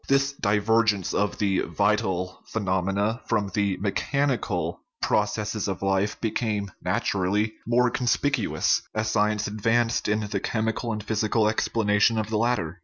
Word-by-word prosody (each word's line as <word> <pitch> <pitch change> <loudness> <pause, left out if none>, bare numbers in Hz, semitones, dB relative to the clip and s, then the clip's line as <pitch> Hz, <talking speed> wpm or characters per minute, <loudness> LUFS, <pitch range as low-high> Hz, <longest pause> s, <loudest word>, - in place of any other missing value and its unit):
This 135 0 +3
divergence 105 -3 +1
of 105 0 0
the 100 -3 +1
vital 95 0 0
phenomena 100 +3 -1
from 105 -3 0
the 100 -2 0
mechanical 105 - -1 0.2
processes 105 0 0
of 95 0 -3
life 95 +1 0
became, 105 -3 -2
naturally, 100 +3 0
more 120 +1 +3
conspicuous 125 0 +1
as 110 0 0
science 105 -1 +1
advanced 115 +3 +1
in 105 +1 +1
the 105 -1 -2
chemical 115 +3 -2
and 105 -1 -4
physical 110 +1 +1
ex 110 - 0
planation 110 0 +2
of 110 0 -3
the 110 - +1
latter. 105 -7 0
105 Hz, 135 wpm, -25 LUFS, 100-115 Hz, 0.2 s, This